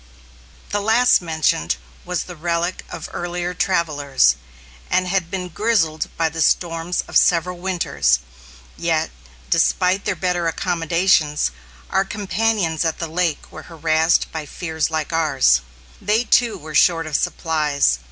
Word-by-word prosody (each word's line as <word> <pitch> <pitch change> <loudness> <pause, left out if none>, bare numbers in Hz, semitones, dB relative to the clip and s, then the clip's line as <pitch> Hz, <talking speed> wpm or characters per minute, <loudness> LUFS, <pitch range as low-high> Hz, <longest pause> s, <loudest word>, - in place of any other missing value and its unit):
The 205 - 0
last 225 +3 +4
mentioned 160 - 0 0.3
was 180 0 -2
the 180 - -10
relic 170 +2 -2
of 160 - -7
earlier 175 0 -3
travellers 145 - +2 0.5
and 185 0 +1
had 180 -2 0
been 180 0 -4
grizzled 175 -5 0
by 165 - +2
the 160 +1 -4
storms 165 +2 +1
of - - -10
several 175 +1 +3
winters. 75 - +1 0.6
Yet, - - -1 0.4
despite 185 - +2
their 195 - 0
better 175 0 -1
accommodations, 165 - +1 0.4
our 190 - +3
companions 200 -4 -1
at 160 -2 -1
the 165 - -4
lake 165 -1 -2
were - - -11
harassed 160 0 +1
by 155 -2 -5
fears 160 -1 -2
like 160 0 -3
ours. 135 - +3 0.4
They 215 +4 +2
too 240 -2 +2
were 155 +1 -10
short 165 +2 +4
of 155 -2 -4
supplies. 150 - +1
170 Hz, 135 wpm, -20 LUFS, 155-180 Hz, 0.6 s, last